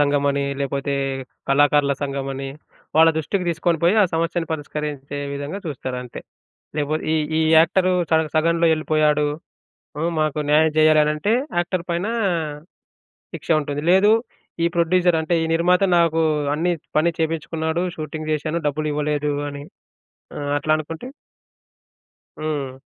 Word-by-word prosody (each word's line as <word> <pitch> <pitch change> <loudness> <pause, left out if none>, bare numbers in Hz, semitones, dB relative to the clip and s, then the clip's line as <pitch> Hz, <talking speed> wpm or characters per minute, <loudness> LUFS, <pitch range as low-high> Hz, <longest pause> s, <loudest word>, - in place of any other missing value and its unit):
సంఘమని 140 -1 +2 0.2
లేపోతే, 140 +1 -2 0.5
కళాకారుల 145 0 +4
సంఘమని, 135 -1 -3 0.5
వాళ్ళ 160 +1 +7
దృష్టికి 180 +5 -1
తీసుకొని 170 0 0
పోయి 175 +4 +4
ఆ - - +5
సమస్యను 165 0 -1
పరిష్కరించే 145 -2 -5 0.2
విధంగా 145 +7 -5
చూస్తారంతే. 125 -4 -5 0.6
లేపో 150 0 0 0.2
ఈ 160 - +2 0.2
ఈ - - +3 0.2
యాక్టర్ 185 +3 +3 0.2
చ - - -2 0.2
సగంలో 165 +1 +2
యెళ్ళిపోయాడు. 155 -1 +2 0.7
హ్మ్, 165 +3 0
మాకు 155 -1 0
న్యాయం 155 +1 +5
చేయాలనంటే 155 +4 +3 0.3
యాక్టర్ 175 0 -1
పైన 170 +3 -1 1.3
శిక్ష - - -9
ఉంటది. 145 -1 -4
లేదు 195 +3 +5 0.5
ఈ - - +4
ప్రొడ్యూసర్ 175 0 +3
అంటే 160 +2 -2
ఈ - - 0
నిర్మాత 180 +3 +3 0.2
నాకు 165 -1 +3 0.3
అన్నీ 175 +3 0 0.3
పని 165 +2 +4
చేపిచ్చుకున్నాడు 160 +1 -1
షూటింగ్ 155 0 -5
చేశాను 155 +2 -2
డబ్బులు 155 +1 -1
ఇవ్వలేదు 150 0 -1 0.2
అని 145 0 -8 0.8
ఆహ్, 145 0 -3
అట్లా 150 +2 -1
అనుకుంటే 160 +8 -7 1.3
హ్మ్. 140 -4 -4
155 Hz, 125 wpm, -21 LUFS, 145-165 Hz, 1.3 s, వాళ్ళ